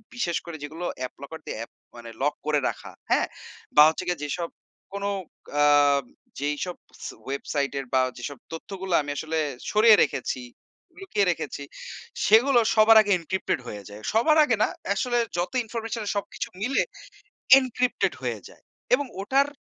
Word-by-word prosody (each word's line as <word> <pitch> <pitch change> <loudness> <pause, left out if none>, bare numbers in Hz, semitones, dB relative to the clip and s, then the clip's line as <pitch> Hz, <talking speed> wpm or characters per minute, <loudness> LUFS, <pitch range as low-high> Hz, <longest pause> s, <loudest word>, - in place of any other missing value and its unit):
বিশেষ 175 -8 0
করে, 170 -2 -7
যেগুলো 160 +4 -6
অ্যাপ 130 - -4
লকার 160 +3 -8
দিয়ে - - -5
অ্যাপ 115 - -7 0.2
মানে 120 -1 -9
লক 145 +1 +2
করে 150 -1 +2
রাখা। - - -8 0.2
হ্যাঁ? - - +3 0.5
বা 150 - +9
হচ্ছে 160 - -4
গিয়ে 175 -4 -1
যেসব, 165 +4 -3 0.4
কোন 200 0 -4 0.6
আ - - +6 0.8
যেইসব 150 +5 -2 0.3
সে - - -5
ওয়েবসাইটের 140 0 -2
বা 130 - +5 0.2
যেসব 140 +2 -6
তথ্যগুলো 185 +2 -5
আমি 145 0 -5
আসলে 160 0 -2 0.3
সরিয়ে 215 +1 +7
রেখেছি, 135 - -2 0.6
লুকিয়ে 215 - 0
রেখেছি, 145 -3 -5 0.6
সেগুলো 240 +4 +6 0.2
সবার 220 +1 +7
আগে 205 -1 -1
এনক্রিপ্টেড 180 -3 -2
হয়ে 105 -1 -7
যায়। 105 +1 -10
সবার 305 +8 +4
আগে 250 -6 +2
না, - - +3 0.3
আসলে 240 +3 0 0.2
যত 175 - -1
ইনফরমেশনের 225 -1 -4
সবকিছু 200 - -3
মিলে, 270 +5 +2 0.8
এনক্রিপ্টেড 250 -1 0
হয়ে - - -2
যায়। - - -19 0.3
এবং 285 +1 +1 0.2
ওটার 275 +6 +2
180 Hz, 150 wpm, -25 LUFS, 145-225 Hz, 0.8 s, বা